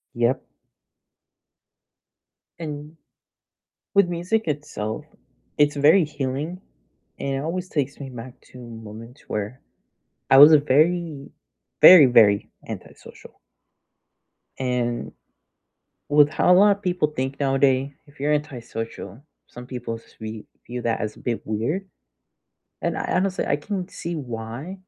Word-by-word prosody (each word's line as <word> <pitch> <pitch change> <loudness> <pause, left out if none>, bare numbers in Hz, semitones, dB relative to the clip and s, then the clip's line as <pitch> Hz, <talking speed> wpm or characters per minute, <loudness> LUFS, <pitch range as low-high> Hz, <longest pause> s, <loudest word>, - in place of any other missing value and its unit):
Yep. 120 +2 +1 2.2
And 150 0 -7 1.0
with 200 -3 +4
music 180 +5 -1
itself, 145 -4 -4 0.5
it's 145 0 +3
very 155 +6 +5
healing, 150 +4 -4 0.6
and 140 0 -3
it - - -2
always 175 +5 -4
takes 145 -3 -3
me 140 - -6
back 120 +1 -9 0.2
to 125 - -12
moments 115 +1 -11
where 105 +5 -4 0.7
I 135 - +8
was 145 +3 +10
a 155 - +8
very, 155 +1 +1 0.5
very, 180 -6 +10
very 110 -5 +4 0.2
antisocial. - - -11 1.2
And 125 -2 -2 1.0
with 145 0 +5
how 180 +3 +3
a - - +7
lot 200 +1 +5
of 200 - -24
people 180 -4 0
think 135 -1 -4
nowadays, 135 0 +2
if 145 -1 -21
you're 150 +1 +1
antisocial, 120 -6 -5 0.3
some 125 0 -11
people 125 -3 -5
s - - -23
we 110 0 -7 0.2
view 125 0 -5
that 115 -1 -1
as 105 0 -4
a - - -15
bit 120 -2 -3
weird, 120 - -2 1.0
and - - -1
I - - -3
honestly, 190 +1 0
I - - +1
can 185 +4 -4
see 170 -2 -6
why. 120 +3 -6
140 Hz, 130 wpm, -23 LUFS, 120-160 Hz, 2.2 s, was